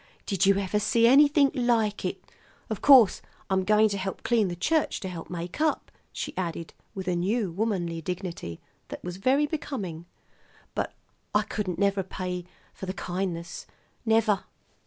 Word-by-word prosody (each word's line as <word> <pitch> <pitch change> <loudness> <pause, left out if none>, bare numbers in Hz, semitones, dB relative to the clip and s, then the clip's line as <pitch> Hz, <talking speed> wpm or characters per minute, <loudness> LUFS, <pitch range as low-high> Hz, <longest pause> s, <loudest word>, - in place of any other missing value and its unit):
Did 195 -1 +1
you 195 0 +5
ever 200 +1 0
see 230 +2 +3
anything 285 +2 +6
like 235 -5 +1
it? - - -2 0.5
Of 220 - -3
course, 260 -8 +7 0.3
I'm 190 0 +2
going 215 +2 +5
to 200 -1 -2
help 190 0 -4
clean 230 -4 +2
the 175 - -4
church 305 - +1
to 190 - -4
help 175 -3 -7
make 175 - -5
up," 315 -1 0 0.2
she - - -5
added 170 -2 -4 0.2
with 190 -1 -5
a 180 - +1
new 195 +3 0
womanly 175 -4 -1
dignity 175 - -5 0.3
that - - -8
was 180 0 -5
very 265 +8 +3
becoming; 200 - -5 0.7
"but - - -3 0.4
I 210 - +4
couldn't 200 -4 -3
never 200 -1 +2
pay 180 -1 -5 0.3
for 190 - -8
the 185 - -2
kindness, 175 -2 -4 0.4
never!" 220 -3 +2
195 Hz, 160 wpm, -27 LUFS, 180-225 Hz, 0.7 s, course